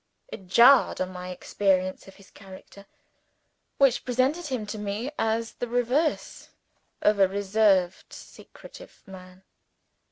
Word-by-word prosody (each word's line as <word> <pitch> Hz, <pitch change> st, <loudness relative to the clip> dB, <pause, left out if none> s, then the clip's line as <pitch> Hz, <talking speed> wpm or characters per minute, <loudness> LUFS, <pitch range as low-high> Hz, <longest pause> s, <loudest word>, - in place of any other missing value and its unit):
It 190 Hz, -, -11 dB
jarred 240 Hz, +8 st, +5 dB
on 185 Hz, 0 st, -3 dB
my 180 Hz, 0 st, -8 dB
experience 185 Hz, 0 st, -2 dB
of 195 Hz, -, -15 dB
his 200 Hz, -1 st, -20 dB
character, 195 Hz, 0 st, -15 dB, 0.9 s
which 270 Hz, -3 st, +2 dB
presented 260 Hz, +7 st, -1 dB
him 255 Hz, -6 st, -4 dB
to 210 Hz, +1 st, -7 dB
me 210 Hz, +6 st, -4 dB
as 225 Hz, +1 st, -1 dB
the 245 Hz, -, -6 dB
reverse 245 Hz, +6 st, -2 dB, 0.5 s
of 210 Hz, -1 st, +2 dB
a 195 Hz, -, +5 dB
reserved 195 Hz, -2 st, 0 dB
secretive -, -, -15 dB
man. 185 Hz, -1 st, -14 dB
205 Hz, 125 wpm, -25 LUFS, 190-245 Hz, 0.9 s, jarred